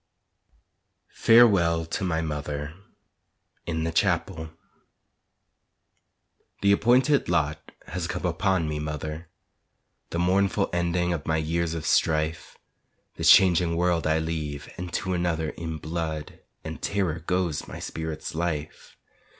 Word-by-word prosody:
FAREWELL 95 Hz, -9 st, +5 dB
TO 85 Hz, +4 st, -3 dB
MY 80 Hz, -3 st, 0 dB
MOTHER 75 Hz, -1 st, -4 dB, 0.9 s
(In 80 Hz, -1 st, -1 dB
the 80 Hz, -, -1 dB
Chapel) 85 Hz, -2 st, 0 dB, 2.1 s
The 100 Hz, -, +4 dB
appointed 125 Hz, -, +3 dB
lot 75 Hz, -3 st, -1 dB
has 85 Hz, -1 st, -4 dB
come 90 Hz, -, -4 dB
upon 90 Hz, -1 st, +1 dB
me, 75 Hz, -1 st, -3 dB
mother, 75 Hz, +2 st, -5 dB, 0.8 s
The -, -, -3 dB
mournful 95 Hz, +3 st, +1 dB
ending 85 Hz, 0 st, 0 dB
of 80 Hz, -3 st, -5 dB
my 80 Hz, -, +2 dB
years 80 Hz, +1 st, -1 dB
of 80 Hz, -, -5 dB
strife, 80 Hz, 0 st, 0 dB, 0.6 s
This -, -, +3 dB
changing 90 Hz, -3 st, +6 dB
world 85 Hz, -1 st, +1 dB
I 80 Hz, 0 st, +3 dB
leave, 80 Hz, -2 st, -4 dB
and 90 Hz, 0 st, -6 dB
to 95 Hz, 0 st, -1 dB
another 85 Hz, -3 st, -1 dB
In 80 Hz, -1 st, -5 dB
blood 80 Hz, -1 st, -4 dB, 0.2 s
and 80 Hz, 0 st, -7 dB
terror 95 Hz, -5 st, -1 dB
goes 85 Hz, -2 st, -1 dB
my -, -, -8 dB
spirit's 80 Hz, -1 st, -5 dB
life. 80 Hz, -2 st, -4 dB
85 Hz, 120 wpm, -26 LUFS, 80-90 Hz, 2.1 s, changing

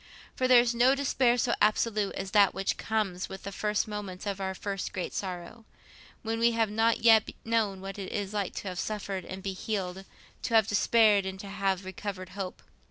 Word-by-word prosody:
For 255 Hz, -, +1 dB
there 250 Hz, -1 st, +8 dB
is 240 Hz, -1 st, 0 dB
no 245 Hz, +3 st, +4 dB
despair 260 Hz, -3 st, +2 dB
so 240 Hz, 0 st, +1 dB
absolute 210 Hz, -1 st, +2 dB
as 190 Hz, -, -5 dB
that 200 Hz, -3 st, +5 dB
which 195 Hz, 0 st, 0 dB
comes 205 Hz, -5 st, -2 dB
with 190 Hz, -, -8 dB
the 200 Hz, -, -5 dB
first 210 Hz, +2 st, -1 dB
moments 205 Hz, -3 st, -6 dB
of 200 Hz, -1 st, -3 dB
our 190 Hz, 0 st, -2 dB
first 195 Hz, 0 st, -4 dB
great 185 Hz, -3 st, -4 dB
sorrow, 185 Hz, +4 st, -5 dB, 0.6 s
when 225 Hz, 0 st, -2 dB
we 235 Hz, 0 st, +4 dB
have 225 Hz, -2 st, +1 dB
not 225 Hz, +2 st, +2 dB
yet 225 Hz, -2 st, +6 dB, 0.2 s
known 220 Hz, -4 st, 0 dB
what 195 Hz, +1 st, -7 dB
it 190 Hz, -, -5 dB
is 205 Hz, -1 st, -3 dB
to 205 Hz, -3 st, -2 dB, 0.2 s
have 180 Hz, -1 st, -4 dB
suffered 200 Hz, -3 st, -3 dB
and 190 Hz, 0 st, -8 dB
be 195 Hz, -1 st, -2 dB
healed, 190 Hz, -2 st, -3 dB, 0.4 s
to 230 Hz, -, -1 dB
have 220 Hz, -2 st, +6 dB
despaired 210 Hz, -1 st, +4 dB
and 190 Hz, 0 st, -6 dB
to 200 Hz, -, -8 dB
have 195 Hz, -1 st, -1 dB
recovered 190 Hz, -1 st, -6 dB
hope. 185 Hz, -1 st, -6 dB
205 Hz, 200 wpm, -29 LUFS, 190-225 Hz, 0.6 s, there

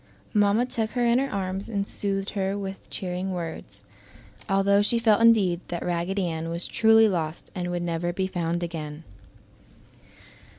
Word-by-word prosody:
Mamma 210 Hz, +2 st, +3 dB
took 225 Hz, -3 st, -2 dB
her 245 Hz, -1 st, +1 dB
in 235 Hz, +1 st, +4 dB
her 275 Hz, +1 st, -1 dB
arms 195 Hz, 0 st, -3 dB
and 200 Hz, -2 st, -2 dB
soothed 195 Hz, -1 st, -2 dB
her 195 Hz, -1 st, -1 dB
with 195 Hz, -1 st, -7 dB
cheering 185 Hz, +1 st, -3 dB
words, 170 Hz, -3 st, -6 dB, 0.7 s
although 195 Hz, +1 st, +4 dB
she 210 Hz, +3 st, +2 dB
felt 225 Hz, -2 st, +3 dB
indeed 200 Hz, -7 st, +4 dB
that 175 Hz, -1 st, -4 dB
Raggedy 180 Hz, +2 st, -1 dB
Ann 165 Hz, -1 st, -3 dB
was 170 Hz, +1 st, -4 dB
truly 225 Hz, 0 st, +5 dB
lost 165 Hz, -5 st, -3 dB
and 180 Hz, -1 st, -3 dB
would 175 Hz, 0 st, -2 dB
never 170 Hz, 0 st, -1 dB
be 190 Hz, +2 st, -1 dB
found 175 Hz, -2 st, -2 dB
again. 155 Hz, -2 st, -5 dB
190 Hz, 160 wpm, -26 LUFS, 175-205 Hz, 0.7 s, truly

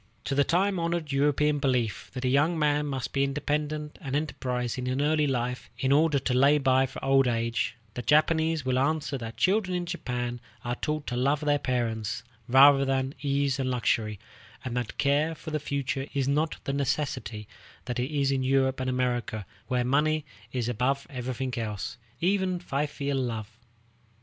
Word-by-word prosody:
To -, -, -2 dB
the 140 Hz, +1 st, +4 dB
time 190 Hz, +4 st, +1 dB
honored 170 Hz, -3 st, -1 dB
European 145 Hz, +1 st, +2 dB
belief, 125 Hz, -5 st, 0 dB
that 130 Hz, 0 st, -3 dB
a -, -, +3 dB
young 145 Hz, +6 st, +3 dB
man 150 Hz, -1 st, +2 dB
must 135 Hz, -3 st, -3 dB
be 135 Hz, -, +2 dB
independent 150 Hz, +2 st, -2 dB
and 140 Hz, -4 st, -3 dB
enterprising 125 Hz, -4 st, -2 dB
in 130 Hz, +1 st, 0 dB
early 150 Hz, +1 st, +2 dB
life 125 Hz, -1 st, -2 dB
in 130 Hz, -, 0 dB
order 150 Hz, +1 st, +4 dB
to 130 Hz, -1 st, 0 dB
lay 140 Hz, +4 st, +5 dB
by 130 Hz, -1 st, +3 dB
for 135 Hz, -, -8 dB
old 135 Hz, -1 st, +4 dB
age, 115 Hz, -1 st, 0 dB, 0.2 s
the 125 Hz, -, -4 dB
Japanese 160 Hz, +3 st, +2 dB
will 130 Hz, 0 st, +2 dB
answer 145 Hz, +1 st, 0 dB
that 115 Hz, -1 st, -7 dB
children 185 Hz, -1 st, +2 dB
in 175 Hz, -, -3 dB
Japan 120 Hz, -8 st, -3 dB, 0.2 s
are 120 Hz, -, -1 dB
taught 150 Hz, +3 st, -2 dB
to 120 Hz, -, -3 dB
love 140 Hz, +4 st, +1 dB
their 145 Hz, -1 st, +2 dB
parents 115 Hz, -3 st, -2 dB, 0.2 s
rather 135 Hz, +2 st, +7 dB
than 135 Hz, 0 st, 0 dB
ease 140 Hz, -1 st, +1 dB
and 130 Hz, -1 st, 0 dB
luxury, 110 Hz, -3 st, 0 dB, 0.5 s
and 125 Hz, -2 st, -3 dB
that 120 Hz, -3 st, -3 dB
care 145 Hz, +3 st, +2 dB
for 160 Hz, -, -8 dB
the 155 Hz, -, 0 dB
future 140 Hz, -1 st, -2 dB
is 135 Hz, -1 st, +1 dB
not 150 Hz, +3 st, +1 dB
the 140 Hz, -, -2 dB
necessity 135 Hz, -7 st, -2 dB, 0.4 s
that 125 Hz, -1 st, -3 dB
it 125 Hz, +2 st, -1 dB
is 140 Hz, -2 st, +1 dB
in 135 Hz, -1 st, +1 dB
Europe 130 Hz, 0 st, +2 dB
and 130 Hz, 0 st, -1 dB
America, 120 Hz, -4 st, -1 dB, 0.2 s
where 125 Hz, -1 st, 0 dB
money 150 Hz, +3 st, +2 dB, 0.3 s
is 125 Hz, -3 st, -1 dB
above 125 Hz, +4 st, 0 dB
everything 130 Hz, 0 st, -3 dB
else, 110 Hz, +1 st, -4 dB, 0.2 s
even 185 Hz, 0 st, +1 dB
filial 140 Hz, -3 st, -2 dB
love. 115 Hz, -3 st, -4 dB
135 Hz, 175 wpm, -28 LUFS, 125-150 Hz, 0.5 s, rather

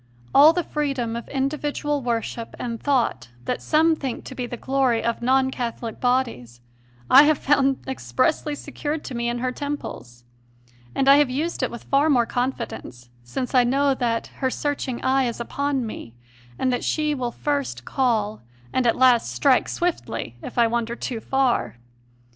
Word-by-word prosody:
All 295 Hz, +3 st, +8 dB
the 350 Hz, +1 st, -1 dB
freedom 275 Hz, -7 st, -2 dB
of 235 Hz, -, -6 dB
individual 290 Hz, +1 st, -1 dB
worship 230 Hz, -1 st, -3 dB
and 230 Hz, -2 st, -5 dB
thought 265 Hz, -, 0 dB, 0.2 s
that -, -, -2 dB
some 320 Hz, +1 st, +3 dB
think 265 Hz, -5 st, -5 dB
to -, -, -7 dB
be 250 Hz, -1 st, -4 dB
the 245 Hz, -, -6 dB
glory 260 Hz, -2 st, +1 dB
of 235 Hz, 0 st, -1 dB
non 260 Hz, +2 st, +3 dB
Catholic 235 Hz, -2 st, -4 dB
bodies 235 Hz, -, -1 dB, 0.5 s
I 270 Hz, -, +9 dB
have 305 Hz, -1 st, +3 dB
found 275 Hz, -1 st, +2 dB
expressly 290 Hz, +3 st, 0 dB
secured 295 Hz, +1 st, -4 dB
to -, -, -7 dB
me 235 Hz, 0 st, -1 dB
in 240 Hz, -, -2 dB
her 250 Hz, +1 st, -1 dB
temples, 245 Hz, -, -6 dB, 0.7 s
and 270 Hz, -, +1 dB
have 280 Hz, 0 st, +6 dB
used 300 Hz, +7 st, -2 dB
it 255 Hz, -, 0 dB
with 235 Hz, -, -9 dB
far 280 Hz, +3 st, +2 dB
more 245 Hz, -5 st, +4 dB
confidence, 235 Hz, -, -4 dB
since 245 Hz, -, -4 dB
I 250 Hz, -1 st, +6 dB
know 275 Hz, +3 st, +2 dB
that 235 Hz, -3 st, -1 dB, 0.2 s
her 260 Hz, -, +2 dB
searching 275 Hz, -3 st, -3 dB
eye 265 Hz, 0 st, +3 dB
is 235 Hz, -1 st, -3 dB
upon 275 Hz, +1 st, -1 dB
me 120 Hz, -, -8 dB, 0.4 s
and 255 Hz, -, +1 dB
that 245 Hz, -, -2 dB
she 305 Hz, -1 st, 0 dB
will 250 Hz, -4 st, -2 dB
first 275 Hz, -, -2 dB
call 220 Hz, -5 st, 0 dB, 0.3 s
and 255 Hz, -2 st, +2 dB
at 230 Hz, -, +3 dB
last 250 Hz, -2 st, +4 dB
strike 270 Hz, -3 st, +3 dB
swiftly 345 Hz, -, -3 dB
if -, -, -8 dB
I 235 Hz, -, +5 dB
wander 235 Hz, 0 st, -1 dB
too 240 Hz, -1 st, -4 dB
far. 265 Hz, -, 0 dB
260 Hz, 170 wpm, -23 LUFS, 235-280 Hz, 0.7 s, I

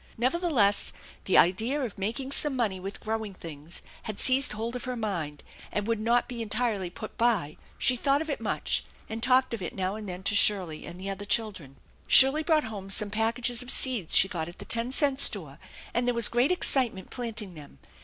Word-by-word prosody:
Nevertheless, 255 Hz, -, +2 dB, 0.3 s
the 190 Hz, -, +3 dB
idea 225 Hz, -, +3 dB
of 250 Hz, -7 st, -4 dB
making 235 Hz, +7 st, -4 dB
some 285 Hz, 0 st, +1 dB
money 215 Hz, -7 st, -1 dB
with 195 Hz, +2 st, -8 dB
growing 220 Hz, -2 st, -4 dB
things 160 Hz, -1 st, -9 dB, 0.2 s
had 215 Hz, -2 st, -6 dB
seized 260 Hz, -1 st, +3 dB
hold 225 Hz, +3 st, -4 dB
of 250 Hz, -, -6 dB
her 255 Hz, 0 st, -3 dB
mind 170 Hz, -10 st, -4 dB, 0.3 s
and 210 Hz, -, -2 dB
would 230 Hz, -1 st, -1 dB
not 235 Hz, +3 st, +1 dB
be 240 Hz, -2 st, -6 dB
entirely 215 Hz, -4 st, -2 dB
put 215 Hz, +5 st, -10 dB
by. 215 Hz, -11 st, +1 dB, 0.2 s
She 255 Hz, -, +3 dB
thought 275 Hz, +3 st, +1 dB
of 320 Hz, -, -4 dB
it 285 Hz, -6 st, -3 dB
much, 220 Hz, -, -1 dB, 0.2 s
and 220 Hz, +1 st, -6 dB
talked 255 Hz, 0 st, +3 dB
of 230 Hz, -, -4 dB
it 175 Hz, -, -6 dB
now 190 Hz, 0 st, -2 dB
and 210 Hz, -2 st, -7 dB
then 180 Hz, +1 st, -7 dB
to 195 Hz, -, +2 dB
Shirley 190 Hz, -6 st, +2 dB
and 175 Hz, +1 st, -9 dB
the 195 Hz, +1 st, -4 dB
other 195 Hz, +1 st, -6 dB
children. 200 Hz, -, -2 dB, 0.3 s
Shirley 270 Hz, +4 st, +7 dB
brought 315 Hz, -1 st, +2 dB
home 205 Hz, -4 st, -7 dB
some 205 Hz, +1 st, +1 dB
packages 230 Hz, +2 st, +1 dB
of 250 Hz, -, -5 dB
seeds 250 Hz, -10 st, +2 dB
she 190 Hz, -, +6 dB
got 170 Hz, -3 st, -4 dB
at 175 Hz, -, -13 dB
the -, -, -10 dB
ten 230 Hz, +2 st, +2 dB
cent 275 Hz, -1 st, +1 dB
store, 155 Hz, -8 st, -1 dB, 0.3 s
and 240 Hz, +1 st, 0 dB
there 245 Hz, -, +1 dB
was 235 Hz, -2 st, +8 dB
great 245 Hz, +6 st, +2 dB
excitement 255 Hz, -, 0 dB
planting 225 Hz, -6 st, -3 dB
them. 150 Hz, -3 st, -13 dB
220 Hz, 205 wpm, -27 LUFS, 190-250 Hz, 0.3 s, was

